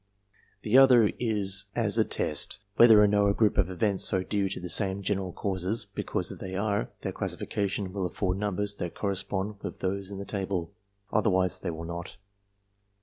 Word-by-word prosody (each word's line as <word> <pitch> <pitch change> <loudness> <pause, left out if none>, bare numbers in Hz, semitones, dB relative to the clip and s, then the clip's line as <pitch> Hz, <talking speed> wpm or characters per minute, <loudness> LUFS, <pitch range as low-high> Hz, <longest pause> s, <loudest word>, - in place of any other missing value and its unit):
The 115 +5 +5
other 125 -5 +6
is 100 -4 +1
as - - +2
a - - +5
test, - - -1 0.2
whether 110 -3 +7
or - - +5
no 100 0 +3
a 100 - +1
group 110 -3 +2
of 95 -3 +2
events 95 +2 +3
are 95 - 0
due 100 0 -1
to 100 - -4
the 90 - -6
same 95 +3 +1
general 95 -1 -2
causes; 95 +4 -3
because, 100 0 -3
if - - -9
they 95 0 -6
are, 100 +1 -1
their - - -3
classification 100 -1 -3
will 95 -3 -2
afford 95 0 -2
numbers 105 0 -2
that 85 - -5
correspond 100 +1 -2
with - - -6
those 95 0 -3
in 100 - -6
the 100 - -6
table; 95 -5 -3 0.4
otherwise 95 -3 +2
they 95 - -4
will 85 0 -6
not. 85 +2 -7
100 Hz, 185 wpm, -28 LUFS, 95-105 Hz, 0.4 s, whether